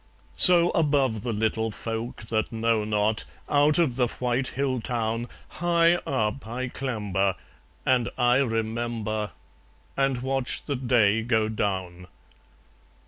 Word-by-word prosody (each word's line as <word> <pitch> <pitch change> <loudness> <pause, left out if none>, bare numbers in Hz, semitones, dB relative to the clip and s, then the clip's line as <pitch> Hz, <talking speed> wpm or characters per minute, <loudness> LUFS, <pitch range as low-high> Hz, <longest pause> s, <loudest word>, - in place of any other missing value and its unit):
So 175 -1 +8
above 140 -8 +1
the 120 - -3
little 110 +1 -1
folk 115 +2 -6
that 110 0 -2
know 115 -1 0
not, 105 +1 0 0.2
Out 145 +1 +4
of 150 -8 +1
the 125 -2 +2
white 125 +2 -2
hill 130 -3 -2
town, 115 0 -2 0.2
High 170 0 +2
up 110 -2 -2
I 125 +2 -4
clamber; 100 -8 -2 0.5
and 125 -2 +2
I 125 -1 +3
remember; 115 -3 -2 0.7
And 135 -2 0
watch 135 -1 -1
the 145 - -3
day 120 -4 +2
go 110 -2 0
down. 95 -4 -3
120 Hz, 125 wpm, -25 LUFS, 110-130 Hz, 0.7 s, So